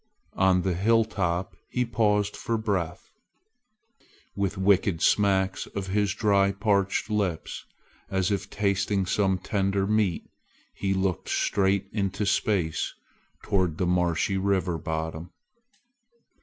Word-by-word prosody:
On 95 -1 +3
the 95 - 0
hilltop 95 -3 +1
he 125 0 0
paused 105 -3 +1
for 115 - -2
breath. 95 -6 -3 1.2
With 100 -1 -1
wicked 95 -2 +2
smacks 95 -2 +2
of 100 -2 -5
his 100 0 +1
dry 100 -2 +3
parched 100 +1 0
lips, 95 -6 -2 0.4
as 95 0 0
if 100 -1 -2
tasting 100 -1 0
some 95 0 +1
tender 95 +1 0
meat, 105 -4 0 0.5
he 95 0 -1
looked 95 -2 -1
straight 100 0 +1
into 100 -1 -1
space 95 -5 0 0.5
toward 90 -5 0
the 90 - 0
marshy 90 +1 +1
river 95 -3 0
bottom. 80 +2 -4
95 Hz, 115 wpm, -26 LUFS, 90-100 Hz, 1.2 s, On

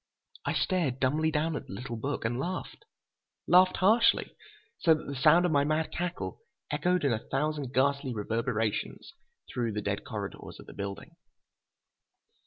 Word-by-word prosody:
I - - 0
stared 160 -9 0
dumbly 150 +5 +2
down 160 +1 0
at - - -5
the - - -8
little 120 +4 -5
book 135 +2 -3
and 120 +2 -1
laughed. 185 - -5 0.6
Laughed 185 +1 +6
harshly, 225 +5 +3 0.4
so 165 -2 +5
that 155 - -7
the 140 - -5
sound 170 +7 +5
of 175 - +1
my 140 -2 +4
mad 155 +2 0
cackle 180 - -4 0.3
echoed 180 -3 +1
in 135 - +3
a 110 - -4
thousand 145 -1 -1
ghastly 140 0 +1
reverberations 115 0 -2 0.4
through 115 -3 -1
the 105 - -2
dead 100 0 -2
corridors 100 -2 -6
of - - -11
the - - -11
building. 100 -1 -6
140 Hz, 160 wpm, -29 LUFS, 115-165 Hz, 0.6 s, Laughed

